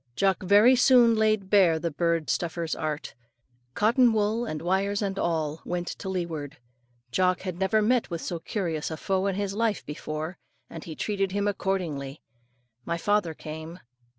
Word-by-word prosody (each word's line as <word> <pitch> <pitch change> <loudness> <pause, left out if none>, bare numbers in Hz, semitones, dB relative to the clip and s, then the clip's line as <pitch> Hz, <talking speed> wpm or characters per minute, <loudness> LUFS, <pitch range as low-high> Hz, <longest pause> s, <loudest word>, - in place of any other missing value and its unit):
Jock 195 +4 +1
very 205 +7 +6
soon 245 -2 +6
laid 215 -3 +1
bare 185 -6 +5
the 165 +1 -3
bird 165 0 0
stuffer's 170 -1 -2
art. 155 -2 -4 0.6
Cotton 235 +3 +4
wool 220 +2 +1
and 155 - -4
wires 195 +4 0
and 195 -1 -2
all 160 -2 -1
went 175 0 -3
to 190 - -6
leeward. 165 -5 -4 0.5
Jock 185 +5 +2
had 185 -2 -5
never 210 +3 +2
met 245 +2 +2
with 170 -2 -4
so 170 - -4
curious 165 -5 -3
a 160 - -5
foe 190 +3 0
in 195 - -1
his 200 0 -2
life 220 0 -1
before, 155 +3 -5 0.3
and 165 - -8
he 160 - -7
treated 195 -1 -1
him 205 0 0
accordingly. 170 -9 -2 0.6
My 170 +5 -2
father 205 -3 0
came. 160 +3 -8
185 Hz, 165 wpm, -27 LUFS, 160-205 Hz, 0.6 s, very